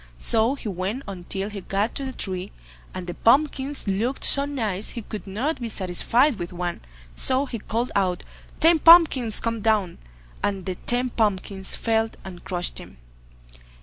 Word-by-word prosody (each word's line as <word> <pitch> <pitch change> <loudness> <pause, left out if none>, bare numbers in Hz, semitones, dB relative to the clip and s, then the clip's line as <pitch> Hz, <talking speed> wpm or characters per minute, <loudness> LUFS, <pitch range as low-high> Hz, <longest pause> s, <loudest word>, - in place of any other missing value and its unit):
So 225 - +1
he 265 - -7
went 200 +7 -3
on 185 -3 -7
till 195 +3 -3
he 200 -1 -6
got 200 +4 -1
to 275 - -2
the 265 - -4
tree, 190 -5 -4 0.4
and 185 - -6
the 175 - -5
pumpkins 275 - +1
looked 225 +7 -1
so 280 0 +5
nice 220 -8 -1
he 235 - -6
could 210 0 -7
not 250 +11 -2
be 235 - -3
satisfied 215 - +1
with 175 -1 -5
one, 175 -1 -4 0.3
so 260 - +3
he 240 -4 -6
called 230 +4 -2
out, 185 -3 0 0.4
"Ten 330 0 +5
pumpkins 305 -9 +6
come 230 -1 -2
down", 210 -5 +1 0.4
and 195 -2 -2
the 185 - -2
ten 245 +6 -1
pumpkins 195 -3 -1
fell 225 -1 +1 0.2
and 180 -2 -9
crushed 175 -1 -3
him. 65 - -12
215 Hz, 170 wpm, -24 LUFS, 190-255 Hz, 0.4 s, pumpkins